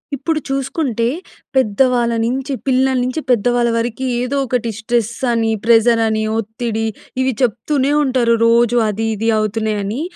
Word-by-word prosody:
ఇప్పుడు 310 +4 -1
చూసుకుంటే, 270 -3 -1 0.5
పెద్దవాళ్ళ 245 0 +2
నించి, 265 +4 -2
పిల్లల 265 0 +2
నించి, 255 +5 -2
పెద్దవాళ్ళ 240 +1 +2
వరకి, 240 +3 -2 0.2
ఏదో 250 +3 -2
ఒకటి 240 -1 -1
స్ట్రెస్ 235 0 -1 0.2
అని, 225 -1 +1
ప్రెజర్ 230 0 +4
అని, 220 0 0 0.2
ఒత్తిడి, 225 0 -3 0.3
ఇవి 260 0 +1
చెప్తూనే 260 +4 0
ఉంటారు. 255 -4 +2
రోజూ 235 +1 +3
అది, 220 +2 -2
ఇది 225 +2 -1
అవుతున్నాయని. 215 +2 -2
235 Hz, 130 wpm, -17 LUFS, 225-260 Hz, 0.5 s, ప్రెజర్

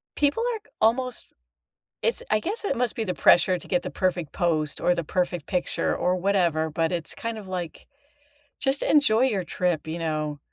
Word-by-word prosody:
people 295 +10 +1
ark 435 -1 -7
almost 250 +2 +1 0.7
it's - - 0
I 215 - +4
guess 405 - -3
it 275 - 0
must 245 -2 +1
be 225 - -1
the 185 -4 -2
pressure 180 +1 +5
to - - -12
get 180 - 0
the - - -4
perfect 180 -5 -1
post 155 -5 0
or 180 - +3
the 170 - -2
perfect 175 0 -1
picture 180 -3 0
or 180 +1 +1
whatever, 175 -4 +1
but, 165 +2 0
it's 170 -2 -2
kind 230 -1 -4
of, 200 -3 -9
like, 180 -3 -5 0.7
just 270 +1 +1
enjoy 255 -6 +4
your 215 -8 +1
trip, 175 -2 -1
you 160 +2 -4
know? 155 -2 -2
180 Hz, 190 wpm, -25 LUFS, 170-225 Hz, 0.7 s, pressure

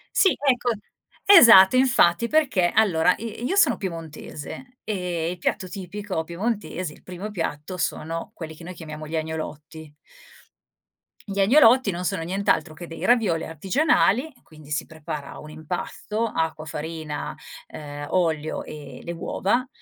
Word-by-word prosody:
Sì, 385 - +5
ecco. 250 -4 +1 0.5
Esatto, 235 - +9
infatti, 235 -6 +4
perché 260 - +2
allora, 180 -5 +4
i 230 +2 -6
io 385 - 0
sono 405 - +4
piemontese 170 - -7
e 180 -5 -2
il 180 - -6
piatto 185 +1 -2
tipico 195 -2 -4
piemontese, 185 -2 -3
il - - -17
primo 185 +4 -7
piatto, 165 -1 -4
sono 165 0 -3
quelli 160 -2 -8
che 165 - -12
noi 180 - -7
chiamiamo 155 -2 -8
gli 160 - -5
agnolotti. 155 -1 -5 1.4
Gli 200 0 -3
agnolotti 235 0 +6
non 175 +1 -4
sono 180 -3 -1
nient'altro 175 -3 0
che 175 +2 -9
dei 165 - -6
ravioli 215 -9 +2
artigianali, 235 - +2
e 260 - -24
quindi 155 -1 -16
si 145 - -1
prepara 160 -2 -7
un 155 - -10
impasto: 180 +7 -4
acqua, 160 -6 -2
farina, 155 0 -5 0.3
ehm, 145 -1 -8
olio 160 -4 0
e 140 -4 -10
le 170 - -5
uova. 200 +8 -1
175 Hz, 140 wpm, -24 LUFS, 160-215 Hz, 1.4 s, Esatto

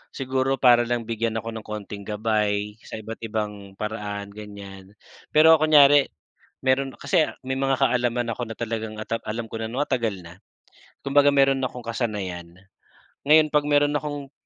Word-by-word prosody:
siguro 130 0 0
para 120 -2 +4
lang 120 -1 -1
bigyan 115 0 -2
ako 115 - -6
ng 110 -1 -8
konting 105 -2 -7
gabay 105 -1 -1
sa - - -8
iba't 110 +1 -8
ibang 105 -3 -5
paraan, 105 -1 -5
ganiyan. 100 -2 -11 0.4
Pero 160 +1 +7
kunyari 145 -2 +6 0.6
meron 135 +1 +2
kasi 180 -4 +2 0.2
may 130 - -1
mga 135 0 +1
kaalaman 120 -2 +1
ako 120 -1 -5
na 115 - -6
talagang 110 -2 -4
ata 115 +1 -3
alam 115 +2 -4
ko 115 0 -7
na 110 - -4
ano 125 - -5
matagal 115 -10 -2
na, 85 +3 -14 0.7
kumbaga 145 +1 +4
meron 135 -1 +3
akong 125 -1 -5
kasanayan. 95 -7 -4 0.7
Ngayon 155 0 +6
'pag 150 0 +2
meron 145 0 +3
akong 145 -2 -4
115 Hz, 160 wpm, -24 LUFS, 105-135 Hz, 0.7 s, Pero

